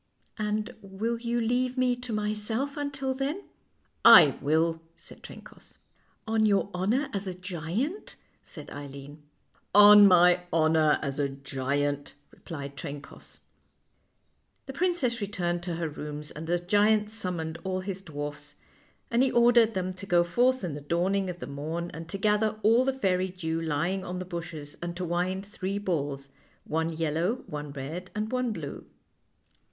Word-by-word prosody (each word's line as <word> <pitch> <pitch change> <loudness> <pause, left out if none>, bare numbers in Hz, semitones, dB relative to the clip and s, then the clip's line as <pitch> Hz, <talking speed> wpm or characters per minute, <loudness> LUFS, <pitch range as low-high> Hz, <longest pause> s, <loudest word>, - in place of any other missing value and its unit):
" - - -37
And 215 +3 -2
will 215 +4 -3
you 235 0 -1
leave 250 +2 0
me 250 -1 +2
to 245 -1 -7
myself 215 +6 -1
until 275 -2 -2
then? 280 +9 -3 0.2
' - - -43
" - - -43 0.2
I 150 -5 +4
will," 160 +3 +1
said - - -11
Trencoss. - - -13 0.2
" - - -39
On 220 0 +2
your 200 -1 +2
honor 215 +11 0
as 200 -1 -2
a 185 - -4
giant? 185 - -4
" - - -40
said 150 -4 -9
Eileen. 145 +1 -9 0.3
" - - -46 0.2
On 205 0 +10
my 180 -1 +6
honor 160 -1 +3
as 140 -1 -3
a 140 -1 +1
giant," 140 +1 -2 0.2
replied 140 -4 -8
Trencoss. 140 +2 -8 1.2
The 270 - -7
princess 280 -8 +1
returned 175 -4 -2
to 175 -1 -4
her 165 0 -2
rooms, 150 0 -6
and 160 +2 -8
the 175 +1 +2
giant 210 +4 +2
summoned 175 -7 -3
all 185 -1 -2
his 190 0 -5
dwarfs, 145 -3 -7 0.6
and 235 +1 +3
he 265 - +4
ordered 235 -2 +4
them 185 0 -2
to 185 +2 -9
go 175 -1 +4
forth 245 +8 +2
in 170 -5 -3
the 145 - -6
dawning 185 +5 0
of 175 - -5
the - - -7
morn 160 +5 -4
and 165 0 -8
to 195 - -3
gather 215 +1 +1
all 230 +4 +5
the 270 - +1
fairy 190 -8 0
dew 165 -3 -3
lying 165 +5 -1
on 180 +1 -5
the 185 - -4
bushes, 165 -4 -7
and 175 0 -5
to 180 - -3
wind 180 +3 -1
three 195 -1 -4
balls 145 -8 -3 0.3
one 160 +1 -1
yellow, 165 +8 -1
one 150 -1 -6
red, 155 +7 -6
and 215 +1 -2
one 250 -2 0
blue. 160 -9 -7
185 Hz, 170 wpm, -28 LUFS, 160-215 Hz, 1.2 s, On